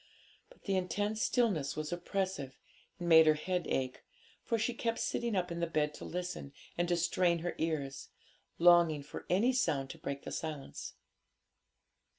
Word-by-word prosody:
But - - -21
the 195 - 0
intense 205 +4 -1
stillness 210 - +1
was 155 +2 -3
oppressive, 175 -6 -3 0.4
and 175 -2 -5
made 160 -1 +8
her 155 - +6
head 180 +2 -2
ache, 130 -1 -2 0.4
for 230 - 0
she 225 +2 0
kept 230 -1 -1
sitting 235 -3 -1
up 180 -2 0
in 170 - -3
the 170 - 0
bed 150 -2 0
to - - -9
listen, 180 -5 -5 0.2
and 175 0 0
to 175 0 +2
strain 170 0 +2
her 175 - -1
ears, 150 -4 -2 0.5
longing 170 -4 +5
for 145 - -9
any 220 +9 +3
sound 145 - 0
to - - -12
break 140 0 -5
the - - -6
silence. 155 -4 -5
175 Hz, 165 wpm, -33 LUFS, 155-190 Hz, 0.5 s, made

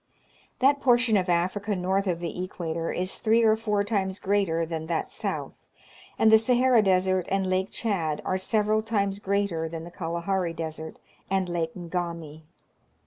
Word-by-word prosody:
That 280 +2 +4
portion 240 -3 +4
of 185 -2 +1
Africa 185 +4 0
north 190 +2 0
of 170 -2 -1
the 175 +1 -3
equator 165 -2 -3
is 185 +1 -2
three 225 +1 +3
or 220 -1 +5
four 210 -2 0
times 195 -2 -1
greater 190 -5 +1
than 160 -1 -5
that 165 -1 -2
south, - - -4 0.5
and 220 - +5
the 220 - +8
Sahara 250 0 +4
Desert 185 -2 +2
and 195 0 +1
Lake 185 +1 0
Chad 165 -9 -1
are 185 - 0
several 215 +2 +1
times 200 -3 -1
greater 200 -5 -1
than 165 0 -6
the 170 - -10
Kalahari 170 +1 -2
Desert 160 -1 -6 0.3
and 190 -1 +1
Lak§ 165 -2 -2 0.2
Ngami. 170 -4 -4
190 Hz, 160 wpm, -26 LUFS, 170-210 Hz, 0.5 s, the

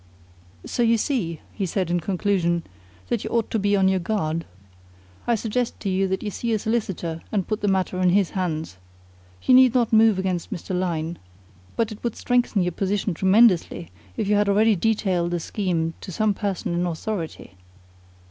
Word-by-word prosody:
"So - - -2
you 230 -1 +4
see," 205 - -2
he 195 -3 -2
said 180 -1 -1
in 175 - +2
conclusion, 175 -2 0 0.5
"that 235 -3 -1
you - - -4
ought 230 -2 0
to 225 - +1
be 205 0 +2
on 190 -1 +3
your 190 0 +2
guard. 165 -4 -2 0.8
I 235 - +3
suggest 230 +2 -2
to 200 - -2
you 190 +1 +1
that 190 0 -2
you 210 - -3
see 230 +3 -2
a - - +2
solicitor 190 -7 -2
and 200 -4 -1
put 215 -1 -2
the 205 - 0
matter 190 -1 0
in 180 - +4
his 195 0 +2
hands. 160 - -3 0.7
You - - +4
need 255 -1 +7
not 235 -3 +2
move 220 -2 +5
against 185 -2 -2
Mr. 180 +2 -4
Lyne, 170 -2 -2 0.6
but 230 -1 0
it 215 - -10
would 235 - -2
strengthen 245 -5 +1
your 180 - 0
position 195 +2 -1
tremendously 190 - +3 0.3
if - - -1
you 210 - +2
had 205 0 +2
already 215 +2 +4
detailed 190 -4 0
the 175 0 -1
scheme 165 -3 -2
to - - -7
some 210 +4 +1
person 195 -4 -3
in 175 +1 0
authority." 170 - -5
195 Hz, 185 wpm, -24 LUFS, 175-220 Hz, 0.8 s, need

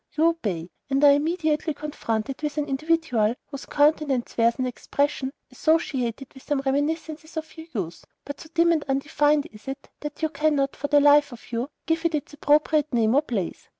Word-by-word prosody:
You 315 - +4
obey, 190 - -3 0.2
and 275 +1 +1
are 290 - +9
immediately 310 0 0
confronted 270 -4 -3
with 300 0 -3
an 300 - +1
individual 275 -6 +1
whose 280 -2 -9
countenance 290 -4 +2
wears 230 0 +3
an 255 - 0
expression 275 +2 -1 0.2
associated 270 -6 0
with 265 - -13
some 290 -1 -1
reminiscences 310 +3 -2
of 315 0 -5
your 320 0 -10
youth, 175 -7 -4 0.2
but 285 - -7
so 315 - -12
dim 335 0 +4
and 315 -3 +1
undefined 290 +2 +2
is 210 +2 -16
it, 270 +1 -7
that 295 +1 -7
you 315 - +2
cannot, 285 -2 +1
for 285 - -3
the 290 0 +5
life 290 0 +5
of 240 -1 -12
you, 240 +4 -2 0.2
give 325 0 0
it 335 -2 +1
its 295 0 -4
appropriate 300 +1 +2
name 230 -2 +2
or 285 - +5
place. 220 - -4
290 Hz, 185 wpm, -25 LUFS, 265-310 Hz, 0.2 s, are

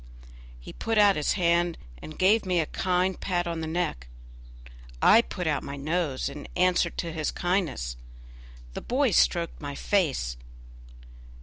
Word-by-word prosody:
He - - -11
put 225 -1 -2
out 205 -2 +6
his 150 - 0
hand 170 -2 +1 0.2
and 155 - -10
gave 205 +4 +4
me 180 -2 0
a 160 - +1
kind 185 +3 -1
pat 175 -2 -1
on 170 -1 -3
the 160 - -4
neck. 160 - -2 0.9
I 225 - +7
put 180 -6 -6
out 150 -3 0
my 140 - -6
nose 150 -1 -2
in 145 +1 -8
answer 180 -1 +3
to 170 0 -5
his 155 -2 -2
kindness; 170 - -2 0.8
the - - -5
boy 260 0 +1
stroked 170 -2 +1
my 145 -1 -5
face. 140 - 0
170 Hz, 150 wpm, -27 LUFS, 150-185 Hz, 0.9 s, I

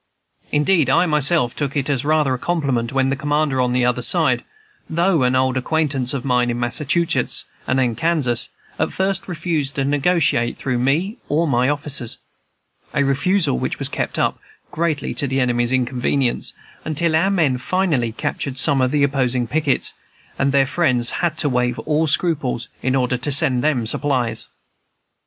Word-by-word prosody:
Indeed, 150 -1 +2
I 175 - +4
myself 150 -5 +1
took 145 0 -2
it 135 - -1
as 140 -4 0
rather 150 -2 +2
a 125 - -3
compliment 135 -9 -1
when 135 0 +1
the - - +1
commander 145 -1 0
on 125 -1 +1
the 125 0 +2
other 125 0 +1
side 130 -3 +2 0.5
though 170 -1 +2
an 125 0 +2
old 130 0 +1
acquaintance 135 -2 -1
of 130 - -4
mine 125 -2 +2
in 120 0 -2
Massachusetts 150 +7 0 0.2
and 130 - +1
in 125 -3 +1
Kansas 140 -2 0 0.3
at - - 0
first 190 0 -1
refused 160 -5 -2
to 135 - 0
negotiate 145 -4 +1
through 125 -3 -2
me 160 - 0
or 160 +3 +1
my 125 -1 +2
officers, 145 -5 -3 0.8
a 140 - +3
refusal 145 - +1
which - - -2
was - - -2
kept - - -3
up, - - 0 0.3
greatly 160 -2 -1
to 145 - -1
the 135 +1 -1
enemy's 120 -1 +1
inconvenience, 125 0 0 0.3
until 160 +1 0
our 175 +5 +3
men 155 -10 +1
finally 145 -6 0
captured 130 +3 -4
some 135 0 +2
of 130 - +2
the 145 +1 +1
opposing 130 -3 +1
pickets, 145 +2 0 0.5
and 140 0 +2
their 140 -1 +4
friends 135 -6 +1
had 170 -2 0
to 150 - +2
waive 125 -2 0
all 155 +1 0
scruples 145 -6 0
in 130 +1 0
order 125 -1 +1
to 145 +4 -2
send 130 -2 +3
them 140 -7 +1
supplies. 120 -3 0
140 Hz, 170 wpm, -20 LUFS, 125-155 Hz, 0.8 s, I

